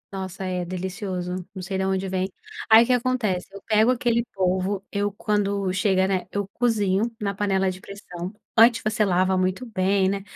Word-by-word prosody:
Nossa 190 -1 -5
é 180 -1 -2
delicioso, 185 0 -4 0.2
não 190 - -5
sei 190 +1 -3
da 190 0 0
onde 190 0 -1
vem. 185 0 -1 0.4
Aí 220 +1 +9
o - - -1
que - - +1
acontece? 245 -7 0
Eu 200 - -9
pego 220 +2 +4
aquele 235 -1 +1
polvo, 190 +1 0
eu 205 0 0
quando 200 -2 0
chega, 190 0 +2
né, 190 -1 -1
eu 205 0 -1
cozinho 215 -3 +1
na 200 -2 -2
panela 195 -1 +1
de 185 - -9
pressão, 190 -2 -8 0.2
antes 230 +1 +6
você 215 0 +1
lava 185 0 +2
muito 185 +6 -1
bem, 195 -3 +1
né, 195 0 -2
195 Hz, 185 wpm, -24 LUFS, 185-210 Hz, 0.4 s, Aí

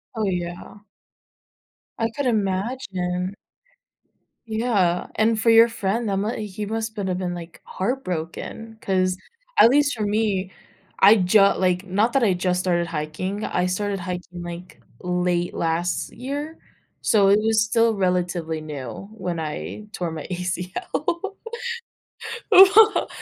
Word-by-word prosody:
Oh, 220 - -1
yeah. 175 0 -4 1.2
I 225 0 +1
could 285 +4 -3
imagine. 195 -3 -1 1.1
Yeah, 215 -6 +1
and 220 +1 +2
for 225 +2 +2
your 225 0 +8
friend, 225 0 -2
that 200 - 0
m 205 +4 -1
he 210 -1 -5
must 220 +1 -3
been 200 -3 -3
a 180 - 0
been, 180 -1 -3
like, 170 -1 -10
heartbroken 205 0 -4
'cause 185 -1 +1 0.4
at - - +9
least 285 +2 +3
for 220 - -3
me, 205 -3 0 0.5
I 205 +3 +8
ju 195 +2 +4 0.2
like, 180 0 +1
not 205 +5 +1
that 270 -2 +3
I 200 -4 +4
just 180 0 0
started 175 -2 0
hiking, 165 +6 -4
I 180 - 0
started 195 +2 -1
hiking 180 -1 -6
like, 175 +1 -9 0.2
late 180 -1 0
last 165 +2 -1
year, 290 +5 -5 0.4
so 205 -4 +4
it 200 +2 +5
was 220 0 +3
still 230 0 +3
relatively 175 -4 -1
new 145 - -7
when 180 -6 -4
I 160 +6 -5
tore 175 -4 -3
my 160 -2 -6
ACL. 185 - -3 1.2
Well, 410 +2 +7
190 Hz, 135 wpm, -23 LUFS, 180-225 Hz, 1.2 s, at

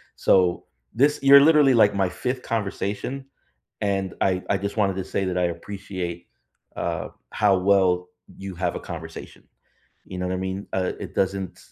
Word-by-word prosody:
So, 90 -2 +2 0.3
this, 145 +4 +3
you're 140 0 +8
literally 150 -3 +6
like 105 -3 +5
my 95 -2 +1
5th 125 +6 -3
conversation, 115 +4 -3 0.6
and 95 -2 -1
I 95 -1 +1
I 100 - +2
just 100 +3 -5
wanted 100 -3 +2
to 95 - -3
say 95 - -2
that 90 -1 -2
I 90 - +1
appreciate, 90 0 -5 0.5
uh, - - -3 0.2
how 100 -2 +3
well 90 -2 +2 0.3
you 95 -1 -7
have 90 0 -2
a - - -3
conversation. 80 -1 -9 0.6
You 90 - -8
know 90 - -2
what 90 - -1
I - - -1
mean? 95 +1 -4
Uh, 95 -1 0
it - - -7
doesn't 95 -1 -1
95 Hz, 170 wpm, -24 LUFS, 90-105 Hz, 0.6 s, you're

